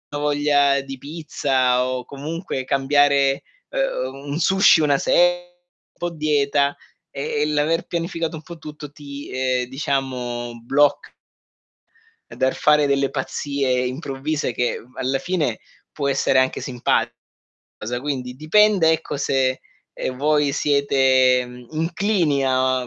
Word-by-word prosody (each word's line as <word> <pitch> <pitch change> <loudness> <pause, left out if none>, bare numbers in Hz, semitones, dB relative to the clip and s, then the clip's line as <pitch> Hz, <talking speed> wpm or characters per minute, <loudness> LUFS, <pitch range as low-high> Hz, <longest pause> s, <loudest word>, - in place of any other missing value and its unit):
ho - - -2
voglia 145 -1 +2
di 135 0 -8
pizza 130 -4 0
o 130 -1 -3
comunque 150 0 -5
cambiare, 140 0 +2 0.3
ehm, - - -2 0.2
un 145 +4 -2
sushi 190 -2 +5
una 145 -2 +3
se 175 0 +2 0.5
po' 175 0 -3
dieta, 145 -2 +1 0.3
e 145 0 -3
e - - +2
l'aver 150 +3 0
pianificato 170 -1 -3
un 155 - -9
po' 170 +2 -10
tutto 150 -2 -9
ti, 145 -1 -9
ehm, 130 -1 0
diciamo 125 -3 -3
bloc 145 +4 +1 1.2
dal 130 0 +1
fare 150 -1 +3
delle 140 -1 +1
pazzie 135 -2 -1
improvvise 135 +1 -3
che, 120 +1 -1
uhm, 125 +2 -19
alla 130 +1 -1
fine 150 -9 -1 0.3
può 140 -2 -3
essere 135 -1 +2
anche 130 0 +1
simpa 125 -2 0 0.7
cosa. 120 +2 -4
Quindi 130 -3 -4
dipende, 170 +3 +4
ecco, 160 -2 -3
se, 135 -2 0 0.3
ehm, 130 - -4
voi 150 0 +2
siete, 130 -3 +3
mhmm, 125 0 -12
inclini 165 -2 0
a 130 -1 +1
140 Hz, 130 wpm, -21 LUFS, 130-155 Hz, 1.2 s, sushi